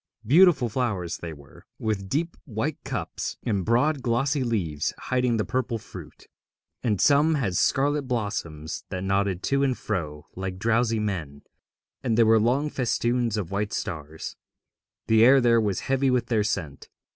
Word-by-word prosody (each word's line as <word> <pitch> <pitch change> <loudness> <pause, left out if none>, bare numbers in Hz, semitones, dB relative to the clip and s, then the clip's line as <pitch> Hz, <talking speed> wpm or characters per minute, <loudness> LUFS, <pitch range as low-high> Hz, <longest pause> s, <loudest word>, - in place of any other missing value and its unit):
Beautiful 155 - +5
flowers 105 -8 -2
they 85 - -6
were, 70 -3 -15
with 100 -3 -2
deep 165 - -1
white 135 +4 -3
cups - - -4
and 100 -5 0
broad 130 - +2
glossy 130 +4 +1
leaves 85 -11 -1
hiding 125 -2 0
the 110 - 0
purple 125 -2 -1
fruit; 95 -9 -12 0.6
and 105 -6 0
some 150 +3 +4
had 110 -11 -1
scarlet 140 +6 +1
blossoms 85 - -3
that 90 0 -4
nodded 95 -1 0
to 140 0 +1
and 135 -3 +1
fro 75 -8 -4
like 95 0 -4
drowsy 115 +2 +1
men, 85 -9 -4 0.6
and 115 - 0
there 115 - +6
were 110 0 +5
long 125 +7 +2
festoons 120 -3 0
of 100 -5 -4
white 105 +1 -2
stars. 80 -2 -5 0.7
The 110 0 +5
air 135 +3 +7
there 120 -2 +4
was 100 -3 -1
heavy 135 0 +1
with 125 -1 0
their 110 -3 +2
scent. 80 -9 -4
115 Hz, 155 wpm, -25 LUFS, 95-130 Hz, 0.7 s, air